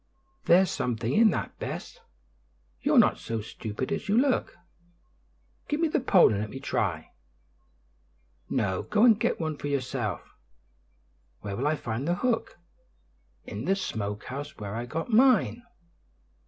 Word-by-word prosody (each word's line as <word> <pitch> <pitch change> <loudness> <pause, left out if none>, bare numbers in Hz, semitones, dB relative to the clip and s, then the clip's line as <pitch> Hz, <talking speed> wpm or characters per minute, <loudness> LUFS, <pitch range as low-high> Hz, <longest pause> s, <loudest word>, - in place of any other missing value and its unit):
"There's 180 +2 +5
something 120 0 -2
in 225 0 +6
that, - - -4
Bess; - - -6 0.8
you're - - +2
not - - +5
so 115 -1 -3
stupid 110 +2 -5
as - - -3
you 210 - +3
look. 265 0 +1 1.1
Give 295 - -1
me 330 -1 +2
the - - +1
pole 200 - +5
and 100 - -1
let 105 - -4
me 135 - -7
try." 90 - -2 1.4
"No, 100 -8 0
go 210 +1 +1
and 225 -3 +6
get - - 0
one 155 -2 -3
for 145 - -5
yourself." 130 - -2 1.2
"Where 100 -1 -5
will 135 +7 -1
I 155 - +2
find 125 0 -4
the 175 - +2
hook?" 240 +4 -1 0.9
"In 105 +4 -6
the 190 +3 +2
smoke 105 - -4
house, 145 +4 -7
where 105 -2 -6
I 120 +2 -4
got 165 - -4
mine." 245 0 +4
140 Hz, 150 wpm, -27 LUFS, -, 1.4 s, in